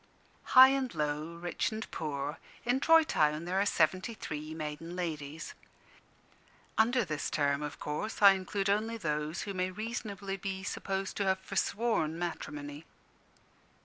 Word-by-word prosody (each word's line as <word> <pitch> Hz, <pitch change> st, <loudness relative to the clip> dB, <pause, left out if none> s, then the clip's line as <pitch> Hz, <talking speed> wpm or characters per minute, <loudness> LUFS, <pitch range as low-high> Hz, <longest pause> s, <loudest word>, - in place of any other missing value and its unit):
High 260 Hz, +1 st, +12 dB
and 270 Hz, -2 st, 0 dB
low, 150 Hz, +2 st, -2 dB
rich 175 Hz, +5 st, -2 dB
and 220 Hz, 0 st, -4 dB
poor, 145 Hz, -1 st, -3 dB, 0.3 s
in 245 Hz, +2 st, +2 dB
Troy 325 Hz, +3 st, +6 dB
Town 150 Hz, -, +1 dB
there 185 Hz, +2 st, +1 dB
are 205 Hz, -, +1 dB
seventy 185 Hz, +7 st, +1 dB
three 155 Hz, -4 st, -6 dB
maiden 160 Hz, +2 st, -5 dB
ladies. 160 Hz, -3 st, -4 dB, 1.2 s
Under 240 Hz, +1 st, +3 dB
this 155 Hz, -3 st, -2 dB
term, 140 Hz, -1 st, +1 dB
of 150 Hz, -1 st, -5 dB
course, 150 Hz, +9 st, -3 dB
I 200 Hz, -1 st, +9 dB
include 195 Hz, +1 st, -1 dB
only 215 Hz, +3 st, +1 dB
those 150 Hz, -3 st, -2 dB
who 200 Hz, -, -4 dB
may 185 Hz, 0 st, 0 dB
reasonably 200 Hz, -1 st, -4 dB
be 190 Hz, 0 st, -4 dB
supposed 195 Hz, -1 st, -3 dB
to 200 Hz, -, 0 dB
have 190 Hz, 0 st, +2 dB
forsworn 190 Hz, -4 st, 0 dB
matrimony. 150 Hz, -3 st, -5 dB
185 Hz, 145 wpm, -31 LUFS, 150-210 Hz, 1.2 s, High